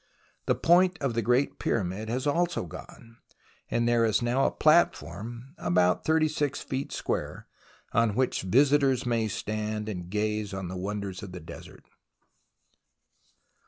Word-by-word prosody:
The - - +3
point 180 +2 +4
of 135 -4 -1
the 115 - 0
Great 125 +5 +1
Pyramid 105 +1 -2
has 125 +4 -2
also 170 +4 0
gone, 115 -9 -12 0.5
and 120 0 +1
there 120 -1 +3
is 110 -2 +2
now 125 +3 +2
a - - -1
platform 120 - +1
about 90 +1 +2
36 155 -3 +1
feet 135 +1 -4
square, - - -3 0.5
on 115 -2 +2
which 130 +1 +1
visitors 135 +4 +3
may 115 -2 +1
stand 105 +1 -3
and 90 -5 -5
gaze 105 0 -2
on 95 -2 -5
the 95 - -5
wonders 100 0 -4
of 95 -2 -8
the 90 - -6
desert. 85 +1 -12
115 Hz, 140 wpm, -28 LUFS, 100-135 Hz, 0.5 s, point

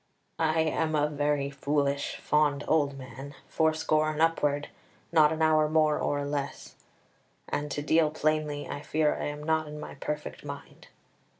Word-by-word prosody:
"I 160 0 +2
am 160 0 0
a 150 0 +3
very 145 -1 0
foolish, 140 0 -1
fond 145 -1 +1
old 145 -3 +2
man, 135 +2 -9
fourscore 155 -1 +2
and 155 0 -4
upward, 150 -3 +1 0.4
not 155 -2 +5
an 160 0 0
hour 155 -1 +4
more 155 -1 +3
or 145 0 -1
less; 140 -1 -4 0.7
and, 150 0 -2
to 145 +1 -3
deal 160 +1 +3
plainly, 155 -1 -1
I 145 - -5
fear 150 0 +1
I - - -4
am 150 0 -5
not 160 0 +1
in 150 0 -7
my - - -7
perfect 150 +1 -5
mind. 140 -1 -9
150 Hz, 160 wpm, -28 LUFS, 145-155 Hz, 0.7 s, not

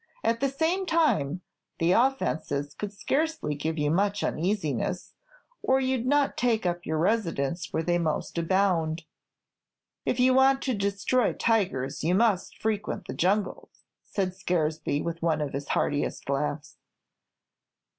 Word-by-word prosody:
"At 230 0 +1
the 275 - +1
same 335 +7 0
time, 180 - +2 0.4
the 165 +1 +2
offences 160 - +1
could 205 +6 -5
scarcely 300 - -1
give 155 +3 -3
you 150 -1 +1
much 200 +4 +1
uneasiness, 175 - -1 0.5
or 265 0 +3
you 260 0 +1
'd 240 - -4
not 285 0 +2
take 230 -4 +1
up 175 -1 -2
your 160 - 0
residence 170 -4 0
where 160 - -1
they 175 +1 +1
most 160 -3 -2
abound." 170 -2 +1 1.0
"If 250 - -1
you 255 +1 +5
want 270 +1 +4
to 260 - 0
destroy 200 +3 +1
tigers, 155 - 0
you 175 +3 +2
must 210 -3 +1
frequent 210 -3 -2
the - - -5
jungle," 195 +4 0 0.3
said 190 -3 -2
Scaresby, 160 -5 -1
with 170 0 -4
one 165 -2 +1
of 150 -2 -3
his 140 +1 -4
heartiest 145 0 -1
laughs. 145 +1 -2
185 Hz, 145 wpm, -27 LUFS, 160-230 Hz, 1.0 s, you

